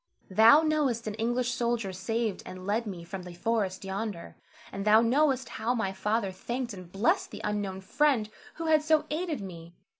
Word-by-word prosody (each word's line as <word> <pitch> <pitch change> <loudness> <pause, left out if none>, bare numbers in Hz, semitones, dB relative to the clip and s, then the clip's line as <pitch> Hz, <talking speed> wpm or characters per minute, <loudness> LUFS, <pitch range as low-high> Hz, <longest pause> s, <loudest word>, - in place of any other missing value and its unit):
Thou 225 +10 +7
knowest 290 -7 +1
an 215 - -3
English 240 +3 0
soldier 235 -5 -1
saved 225 +2 -2
and 185 0 -9
led 215 +3 0
me 180 -4 -6
from 185 +2 -6
the 180 -1 -10
forest 200 -1 -1
yonder, 195 -2 -5 0.4
and 195 - -4
thou 215 +1 +6
knowest 265 +2 +2
how 235 +3 -1
my 195 -5 -1
father 210 +1 -1
thanked 235 +5 -4
and 185 -3 -10
blessed 200 +5 +1
the 210 - -8
unknown 205 -2 -2
friend 255 +2 +2 0.3
who 330 - -5
had 310 -1 +4
so 310 0 +2
aided 315 - -2
me. 170 -3 -9
220 Hz, 180 wpm, -29 LUFS, 190-245 Hz, 0.4 s, Thou